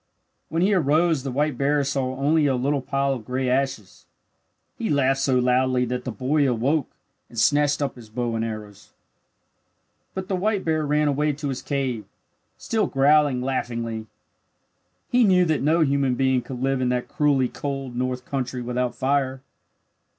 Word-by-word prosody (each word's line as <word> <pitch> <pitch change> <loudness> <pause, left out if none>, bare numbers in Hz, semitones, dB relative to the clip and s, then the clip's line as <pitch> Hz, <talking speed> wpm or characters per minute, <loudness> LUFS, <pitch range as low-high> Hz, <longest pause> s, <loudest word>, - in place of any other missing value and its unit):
When 165 +2 0
he 205 +2 +3
arose 160 -2 +2
the 135 - -4
white 145 0 -1
bear 145 +1 +2
saw 135 -2 -1
only 145 +3 +2
a 135 - +2
little 140 +3 0
pile 135 +1 0
of 120 -4 -6
gray 130 +3 -2
ashes. 125 -6 -2 0.7
He 225 - -3
laughed 135 -2 +2
so 135 -1 +2
loudly 125 0 +2
that 125 +1 -4
the 125 - -3
boy 135 +6 +1
awoke 130 +5 0 0.4
and 120 - -13
snatched 145 +4 +3
up 140 - -3
his 115 -3 -13
bow 120 +1 -2
and 115 - -1
arrows. 105 -3 -7 1.2
But 190 -1 -4
the 195 - -1
white 200 +1 0
bear 155 -2 0
ran 150 +1 +2
away 150 +1 +1
to 145 0 -4
his 130 - -4
cave, 130 -7 -2 0.5
still 220 -2 0
growling 140 -2 +3
laughingly. 115 -4 -3 1.0
He 245 0 +4
knew 185 -4 +4
that 160 -3 0
no 160 +4 +3
human 140 -3 +2
being 130 -1 +2
could 125 0 -7
live 135 -1 +1
in 125 - +1
that 125 0 -1
cruelly 145 -6 +2
cold 135 -3 -5
north 125 0 -2
country 125 -2 -3
without 125 0 -2
fire. 135 -1 0
135 Hz, 170 wpm, -24 LUFS, 125-150 Hz, 1.2 s, He